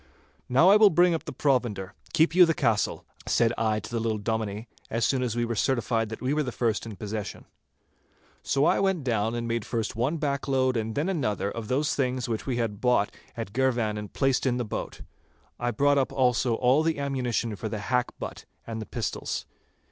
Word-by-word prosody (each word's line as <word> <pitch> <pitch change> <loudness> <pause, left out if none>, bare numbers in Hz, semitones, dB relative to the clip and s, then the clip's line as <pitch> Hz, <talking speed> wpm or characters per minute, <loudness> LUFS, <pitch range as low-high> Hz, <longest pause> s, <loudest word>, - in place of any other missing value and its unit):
'Now 135 +9 +6
I 205 - +8
will 215 -1 +7
bring 175 0 +4
up 165 - -3
the - - -5
provender. 120 -9 0 0.2
Keep 160 +1 +3
you 180 -1 +7
the 165 - +1
castle,' 110 -2 0 0.2
said 115 0 +3
I 110 -1 +1
to - - -9
the 115 - -1
little 110 -1 0
Dominie, 110 +1 -3 0.2
as 115 +1 0
soon 130 -2 +1
as 120 -3 -1
we 120 0 +1
were 115 - -2
certified 115 -1 0
that 110 - -7
we 130 +3 +1
were 150 0 +1
first 115 -3 -1
in 110 - -7
possession. 105 +1 -5 1.0
So 140 +2 +1
I - - +3
went 190 -5 +1
down 115 -2 0
and 120 0 -3
made 115 -1 -1
first 115 -1 -3
one 130 +8 0
backload 135 -3 0
and 110 -1 -2
then 150 +5 0
another 105 - -1
of 115 -2 -6
those 145 +5 +1
things 130 -2 -1
which 115 +1 -3
we 125 -3 -1
had 110 -3 -2
bought 125 -5 +2 0.2
at 110 -4 -5
Girvan 120 -4 +1
and 105 -2 -6
placed 135 -1 +1
in 125 -1 +1
the 120 - -2
boat. 105 - -5 0.6
I 120 - 0
brought 140 +5 +3
up 130 - 0
also 125 -2 +2
all 130 +5 +3
the 160 -1 0
ammunition 125 -5 -1
for 110 +2 -5
the 110 - -3
hackbutt 125 +4 -3 0.2
and 110 -1 -5
the 110 - -7
pistols. 115 -4 -3
120 Hz, 205 wpm, -27 LUFS, 110-135 Hz, 1.0 s, I